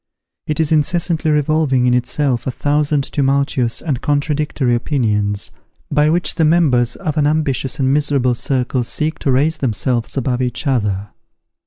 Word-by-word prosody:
It 150 Hz, 0 st, -2 dB
is 160 Hz, -1 st, +1 dB
incessantly 160 Hz, +1 st, +1 dB
revolving 150 Hz, -3 st, +2 dB
in 125 Hz, -, +3 dB
itself 125 Hz, +1 st, 0 dB
a -, -, +1 dB
thousand 145 Hz, +2 st, 0 dB
tumultuous 135 Hz, -4 st, 0 dB
and 140 Hz, -7 st, -2 dB
contradictory 145 Hz, -3 st, 0 dB
opinions, 105 Hz, -6 st, -1 dB, 0.4 s
by 150 Hz, +1 st, +3 dB
which 175 Hz, +3 st, +1 dB
the 165 Hz, -, 0 dB
members 150 Hz, -7 st, +3 dB
of 155 Hz, -5 st, -4 dB
an 145 Hz, -1 st, +3 dB
ambitious 145 Hz, -2 st, -1 dB
and 135 Hz, -2 st, +1 dB
miserable 140 Hz, -4 st, +1 dB
circle 125 Hz, 0 st, -1 dB
seek 155 Hz, +6 st, -2 dB
to 135 Hz, -, 0 dB
raise 145 Hz, +5 st, +2 dB
themselves 120 Hz, +1 st, -2 dB
above 130 Hz, -1 st, -1 dB
each 125 Hz, +4 st, -3 dB
other. 105 Hz, -7 st, -1 dB
140 Hz, 150 wpm, -17 LUFS, 125-150 Hz, 0.4 s, in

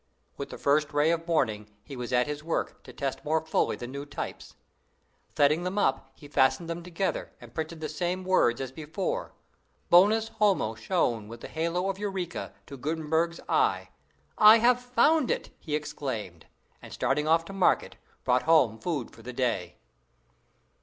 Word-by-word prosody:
With -, -, -6 dB
the -, -, -8 dB
first 150 Hz, +1 st, +1 dB
ray 145 Hz, +2 st, +3 dB
of 165 Hz, 0 st, -2 dB
morning 110 Hz, -10 st, 0 dB
he 140 Hz, -, -9 dB
was 125 Hz, -1 st, -5 dB
at 125 Hz, 0 st, +3 dB
his 150 Hz, 0 st, -5 dB
work, 165 Hz, -, -2 dB
to -, -, -10 dB
test 135 Hz, -2 st, -4 dB
more 160 Hz, +2 st, +1 dB
fully 160 Hz, -, +1 dB
the 120 Hz, -, -7 dB
new 140 Hz, +3 st, -6 dB
types. 145 Hz, -, -7 dB, 0.8 s
Setting 150 Hz, +3 st, +4 dB
them 185 Hz, +3 st, -3 dB
up, 135 Hz, -7 st, 0 dB
he 145 Hz, -, -13 dB
fastened 135 Hz, +3 st, +2 dB
them 170 Hz, +1 st, -4 dB
together, 180 Hz, +2 st, -3 dB
and -, -, -14 dB
printed 160 Hz, 0 st, -5 dB
the 155 Hz, -, -2 dB
same 180 Hz, +2 st, -2 dB
words 160 Hz, -10 st, +3 dB
as 135 Hz, -1 st, -4 dB
before. 160 Hz, -, -4 dB, 0.6 s
Bonus 215 Hz, +5 st, +5 dB
homo 195 Hz, -, +1 dB
shone 115 Hz, -, -1 dB
with 115 Hz, +1 st, -10 dB
the -, -, -7 dB
halo 170 Hz, +3 st, -1 dB
of 195 Hz, 0 st, -3 dB
eureka 190 Hz, -4 st, -4 dB
to 140 Hz, -, -9 dB
Gutenberg's 160 Hz, +4 st, -1 dB
eye. -, -, +1 dB, 0.5 s
"I 215 Hz, +1 st, +9 dB
have 245 Hz, +2 st, +3 dB
found 250 Hz, +4 st, +3 dB
it!" -, -, -2 dB
he 150 Hz, -3 st, -3 dB
exclaimed, 115 Hz, -, -5 dB, 0.3 s
and, -, -, -12 dB
starting 150 Hz, +1 st, 0 dB
off 165 Hz, +1 st, +3 dB
to 195 Hz, -, -9 dB
market, 195 Hz, -2 st, +2 dB, 0.3 s
brought 125 Hz, 0 st, +3 dB
home 140 Hz, -9 st, +3 dB
food 155 Hz, -9 st, -3 dB
for -, -, -15 dB
the 125 Hz, +2 st, -8 dB
day. 120 Hz, -8 st, -1 dB
155 Hz, 175 wpm, -28 LUFS, 130-180 Hz, 0.8 s, I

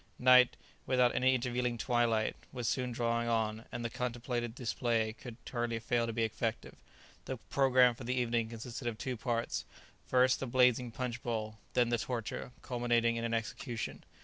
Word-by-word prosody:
Night, 125 Hz, -1 st, +6 dB, 0.3 s
without 125 Hz, -1 st, +4 dB
any 130 Hz, +1 st, +3 dB
intervening 125 Hz, -1 st, -1 dB
twilight, 115 Hz, -2 st, +1 dB, 0.2 s
was 125 Hz, -3 st, -3 dB
soon 125 Hz, +1 st, 0 dB
drawing 115 Hz, 0 st, 0 dB
on, 110 Hz, -1 st, 0 dB
and 120 Hz, -, -4 dB
the -, -, 0 dB
contemplated 120 Hz, -1 st, -3 dB
display 115 Hz, -3 st, 0 dB
could 120 Hz, 0 st, -10 dB
hardly 120 Hz, -2 st, -1 dB
fail 115 Hz, +1 st, 0 dB
to -, -, -1 dB
be 115 Hz, 0 st, 0 dB
effective. 115 Hz, 0 st, -2 dB, 0.5 s
The 130 Hz, -, -4 dB
programme 125 Hz, 0 st, +4 dB
for 120 Hz, -, -10 dB
the 125 Hz, +2 st, -1 dB
evening 115 Hz, -2 st, 0 dB
consisted 115 Hz, +2 st, -6 dB
of 115 Hz, -2 st, -2 dB
two 130 Hz, +2 st, -3 dB
parts; 115 Hz, 0 st, -2 dB, 0.4 s
first, 130 Hz, 0 st, +4 dB
the 135 Hz, -, -3 dB
blazing 125 Hz, 0 st, +3 dB
punch 120 Hz, +1 st, -4 dB
bowl; 110 Hz, -2 st, -3 dB, 0.2 s
then 120 Hz, -1 st, +4 dB
the 120 Hz, -1 st, +1 dB
torture, 120 Hz, 0 st, -4 dB
culminating 120 Hz, -2 st, +1 dB
in 115 Hz, -, -2 dB
an 115 Hz, 0 st, 0 dB
execution. 115 Hz, +1 st, -4 dB
120 Hz, 170 wpm, -33 LUFS, 115-125 Hz, 0.5 s, Night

